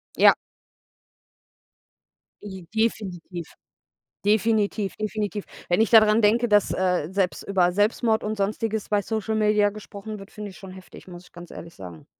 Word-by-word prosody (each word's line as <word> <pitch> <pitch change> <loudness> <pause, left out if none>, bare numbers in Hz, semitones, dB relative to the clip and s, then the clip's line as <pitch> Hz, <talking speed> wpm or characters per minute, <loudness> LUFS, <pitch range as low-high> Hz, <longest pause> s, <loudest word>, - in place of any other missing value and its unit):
Ja. - - +7 2.1
J 190 -4 -9
definitiv. 190 -6 -2 0.8
Definitiv, 210 -1 +1
definitiv. 210 -1 -3 0.2
Wenn 175 +4 +2
ich 225 - +2
daran 215 -1 +6
denke, 230 +3 +3
dass, 205 -1 +3
äh, 180 -4 0
selbst 190 -2 -1
über 185 -3 +2
Selbstmord 220 +3 +1
und 215 +1 -2
Sonstiges 215 +2 -2
bei 205 -1 +2
Social 220 +1 -2
Media 210 -1 +3
gesprochen 210 0 -9
wird, 195 +1 -13
finde 210 -1 -7
ich - - -14
schon 190 -1 -10
heftig, 185 0 -13
muss 175 -1 -11
ich - - -23
ganz 175 0 -12
ehrlich 165 0 -10
sagen. 90 -4 -11
205 Hz, 150 wpm, -24 LUFS, 185-215 Hz, 2.1 s, Ja